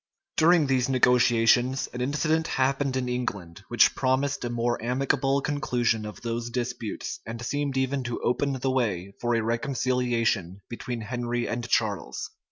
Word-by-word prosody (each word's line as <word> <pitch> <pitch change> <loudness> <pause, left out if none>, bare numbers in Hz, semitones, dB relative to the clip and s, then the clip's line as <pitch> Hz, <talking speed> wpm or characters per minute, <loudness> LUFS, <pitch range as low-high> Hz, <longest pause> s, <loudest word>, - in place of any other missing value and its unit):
} - - -62
During 165 0 +5
these 130 -2 +1
negotiations, 125 0 +3
an 125 - -4
incident 155 +4 +1
happened 135 0 0
in 125 -1 -1
England, 100 -9 -4
which - - +4
promised 135 +2 0
a 120 - -2
more 120 0 -1
amicable 135 +2 +1
conclusion 120 -7 0
of 105 - -9
those 115 0 -3
disputes, 120 -3 -4
and 115 +1 -6
seemed 140 +3 -2
even 130 +1 0
to 120 -1 -3
open 140 +3 +1
the 130 0 -1
way 100 -7 -1
for 120 0 +1
a 115 - +1
reconciliation 115 - 0
between 120 0 -5
Henry 120 +1 -2
and 120 +1 -3
Charles. 110 -5 -1
125 Hz, 155 wpm, -26 LUFS, 115-135 Hz, -, During